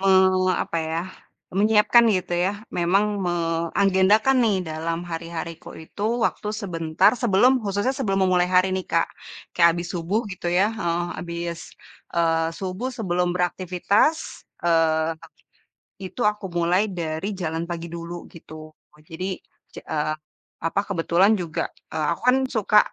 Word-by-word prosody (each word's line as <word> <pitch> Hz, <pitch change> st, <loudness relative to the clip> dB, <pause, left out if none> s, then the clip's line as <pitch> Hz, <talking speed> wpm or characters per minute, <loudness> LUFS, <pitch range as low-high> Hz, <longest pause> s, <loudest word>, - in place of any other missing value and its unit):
me 195 Hz, -, +1 dB, 0.5 s
apa 170 Hz, -, -4 dB
ya, 165 Hz, +1 st, -1 dB, 0.6 s
menyiapkan 215 Hz, +3 st, +5 dB
gitu 180 Hz, -1 st, -4 dB
ya, 190 Hz, -, +2 dB, 0.3 s
memang 185 Hz, +4 st, +3 dB, 0.2 s
me 175 Hz, -, 0 dB, 0.5 s
agendakan 200 Hz, +6 st, +4 dB
nih, 210 Hz, -4 st, +2 dB
dalam 165 Hz, +1 st, -3 dB
hari-hariku 165 Hz, 0 st, -6 dB, 0.2 s
itu 200 Hz, -, -9 dB, 0.2 s
waktu 210 Hz, -, -1 dB
sebentar 165 Hz, -3 st, +2 dB
sebelum 240 Hz, +3 st, +5 dB
khususnya 205 Hz, +6 st, 0 dB
sebelum 195 Hz, -6 st, +1 dB
memulai 180 Hz, -1 st, +2 dB
hari 185 Hz, +1 st, +4 dB
nih 185 Hz, -, -3 dB
Kak. 165 Hz, 0 st, +3 dB, 0.5 s
Kayak 170 Hz, -1 st, +5 dB
abis 170 Hz, 0 st, -4 dB
subuh 180 Hz, +6 st, -1 dB
gitu 185 Hz, -, -7 dB
ya, 180 Hz, +3 st, +3 dB
heeh, 175 Hz, -6 st, -1 dB, 0.2 s
abis, 170 Hz, 0 st, -5 dB, 0.6 s
eee, 165 Hz, -1 st, +2 dB
subuh 190 Hz, +6 st, -3 dB
sebelum 180 Hz, -4 st, 0 dB
beraktivitas, 185 Hz, -, 0 dB, 0.2 s
eee, 165 Hz, -1 st, +2 dB, 0.9 s
itu 185 Hz, +6 st, -8 dB
aku 210 Hz, -1 st, -15 dB
mulai 175 Hz, +3 st, +3 dB, 0.2 s
dari 160 Hz, +3 st, -3 dB
jalan 165 Hz, 0 st, -2 dB
pagi 170 Hz, 0 st, -4 dB
dulu, 170 Hz, +1 st, -7 dB
gitu. 155 Hz, -1 st, -12 dB, 0.4 s
Oh 150 Hz, -, -21 dB
jadi, 185 Hz, +3 st, -4 dB, 0.4 s
ce -, -, -7 dB
eee, 155 Hz, 0 st, -1 dB, 0.5 s
apa 165 Hz, -, +1 dB
kebetulan 185 Hz, +2 st, +3 dB
juga, 170 Hz, -4 st, -2 dB, 0.3 s
eee, 155 Hz, -1 st, -1 dB
aku -, -, -16 dB
kan, 250 Hz, -, +6 dB, 0.2 s
suka 210 Hz, 0 st, +4 dB
175 Hz, 140 wpm, -23 LUFS, 165-195 Hz, 0.9 s, kan